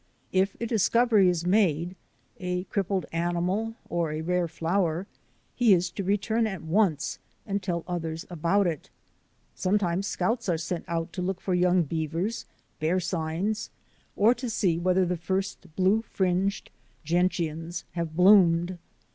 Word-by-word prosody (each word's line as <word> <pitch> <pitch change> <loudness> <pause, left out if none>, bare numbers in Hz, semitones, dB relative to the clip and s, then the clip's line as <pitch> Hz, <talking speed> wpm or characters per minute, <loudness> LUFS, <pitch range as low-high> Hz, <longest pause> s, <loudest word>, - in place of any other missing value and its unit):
If 190 +1 +1
a 235 - -2
discovery 225 -2 +4
is 175 -1 -1
made 180 -3 +2 0.2
— - - -38
a 180 -1 -2
crippled 195 -1 -1
animal 175 +6 -1
or 170 -2 -1
a 155 +1 -3
rare 180 +1 0
flower 170 +1 -1 0.3
— - - -40
he 220 -5 +7
is 175 0 -1
to 200 - -4
return 220 +4 +1
at 190 -5 -5
once 160 -3 +1 0.3
and 200 -1 -2
tell 175 -3 -2
others 165 -2 -4
about 175 +4 +1
it. 165 -4 -3 0.6
Sometimes 190 -1 0
scouts 230 -2 -1
are 170 - +2
sent 170 +1 -4
out 165 -1 -3
to 185 - -4
look 185 +1 -2
for 190 - -2
young 180 0 +3
beavers, 165 +7 -3 0.3
bear 160 +4 +1
signs, 175 +4 -2 0.5
or 220 +4 +5
to 250 0 -5
see 185 -6 +1
whether 185 +1 +2
the 180 0 -1
first 190 +2 -3
blue 195 +4 +3
fringed 190 -1 -1 0.3
gentians 170 0 -1
have 170 -2 -4
bloomed. 180 -2 +5
180 Hz, 150 wpm, -27 LUFS, 170-200 Hz, 0.6 s, he